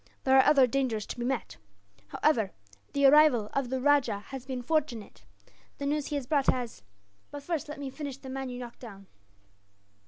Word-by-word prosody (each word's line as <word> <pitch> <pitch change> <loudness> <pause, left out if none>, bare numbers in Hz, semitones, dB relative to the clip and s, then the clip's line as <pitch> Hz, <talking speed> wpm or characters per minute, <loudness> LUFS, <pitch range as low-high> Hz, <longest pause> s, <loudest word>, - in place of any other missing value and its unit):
There 265 0 +4
are 265 - +7
other 280 -3 +6
dangers 245 -4 -1
to - - -7
be - - -2
met. 260 -1 -3 0.5
However, 220 - +1 0.4
the 280 0 +2
arrival 270 -7 +5
of 275 -3 -1
the 260 0 -1
rajah 275 -7 +2
has 265 -2 -8
been 255 -2 -4
fortunate. 280 -7 -2 0.5
The 280 - -5
news 295 0 -1
he 295 - -3
has 280 -3 -3
brought 280 0 +1
has 245 - -1 0.5
but 290 -1 -8
first, 320 -1 -3
let 295 - -7
me 275 -2 -5
finish 280 -1 -6
the 270 - -12
man 265 0 -4
you 245 - -6
knocked 240 -1 -9
down." 200 -5 -11
265 Hz, 190 wpm, -29 LUFS, 245-285 Hz, 0.5 s, are